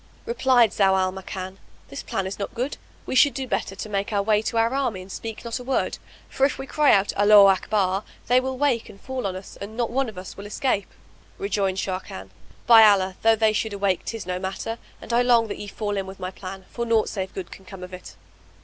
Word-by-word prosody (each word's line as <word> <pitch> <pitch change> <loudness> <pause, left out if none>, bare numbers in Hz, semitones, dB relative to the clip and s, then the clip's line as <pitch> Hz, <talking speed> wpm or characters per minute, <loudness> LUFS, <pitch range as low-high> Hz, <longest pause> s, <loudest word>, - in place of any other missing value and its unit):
Replied 260 - +3
Zau 195 -2 +3
al 185 0 +1
Makan, 190 0 -7 0.3
"This 140 - -6
plan 195 - -3
is 190 +2 -5
not 200 +4 -5
good; 250 +4 -2 0.3
we - - -4
should 280 +2 +5
do 265 -1 -3
better 195 - -2
to 200 - -6
make 200 0 -2
our 200 -1 +1
way 210 0 +3
to 230 - -3
our 230 +2 +2
army 255 -8 -1
and 185 +1 -10
speak 225 +3 -7
not 235 +2 -3
a - - -8
word; 265 +1 -1 0.3
for 265 - -3
if 275 - +3
we 270 - -6
cry 295 +1 +3
out 200 0 +3
'Allaho 205 -1 +7
Akbar,' 195 0 0 0.2
they 250 +2 +4
will 260 0 -3
wake 260 -5 +1
and 195 - -13
fall 260 -2 -4
on 185 - -4
us 190 +1 -10
and 215 +3 -7
not 235 -2 -1
one 265 0 0
of 210 - -12
us 185 +1 -8
will 200 +1 -8
escape." 210 -2 -1 0.5
Rejoined 200 - -1
Sharrkan, 185 - -5 0.3
"By 230 -2 +9
Allah, 190 -3 +4
though 225 0 +5
they 220 0 +2
should 215 0 -1
awake 195 -3 0
tis 225 -4 -5
no 180 0 -3
matter, 190 +5 -4 0.2
and - - -6
I 240 - +4
long 240 -2 +4
that - - -5
ye 205 - -6
fall 205 0 -3
in 195 -1 -3
with 190 0 -10
my 185 0 -4
plan, 190 0 -9
for 235 - -3
naught 230 -2 +2
save 190 -2 -4
good 185 -3 -6
can 190 - -12
come 190 -1 -10
of 180 0 -9
it!" 180 - -10
205 Hz, 240 wpm, -24 LUFS, 190-235 Hz, 0.5 s, By